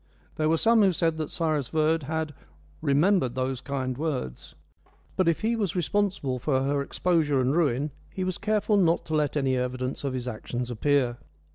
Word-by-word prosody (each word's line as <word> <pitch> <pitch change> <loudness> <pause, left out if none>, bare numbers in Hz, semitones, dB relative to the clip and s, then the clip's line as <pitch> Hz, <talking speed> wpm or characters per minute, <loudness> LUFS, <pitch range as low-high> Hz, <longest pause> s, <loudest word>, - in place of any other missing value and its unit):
There 155 0 +1
were 165 - +3
some 230 +4 +4
who 195 -2 +5
said 165 0 0
that 155 -2 -3
Cyrus 155 -6 -1
Verd 160 +2 +1
had 155 +1 -3 0.5
"remembered 145 -2 +2
those 130 0 -2
kind 130 -2 -3
words"; 135 - -4 0.6
but 185 - +2
if 165 - +2
he 225 +2 +1
was 200 -7 -1
responsible 180 -7 0
for 130 +1 +1
her 140 +1 +1
exposure 150 -2 +1
and 130 +3 +1
ruin 145 -3 +1 0.2
he 185 - -4
was 185 -1 -3
careful 210 0 +1
not 170 -3 +2
to 160 - -5
let 150 -1 +1
any 135 -2 +1
evidence 125 +1 -3
of 135 -2 -2
his 125 -1 -4
actions 120 +1 -4
appear. 125 0 +1
150 Hz, 180 wpm, -27 LUFS, 130-170 Hz, 0.6 s, who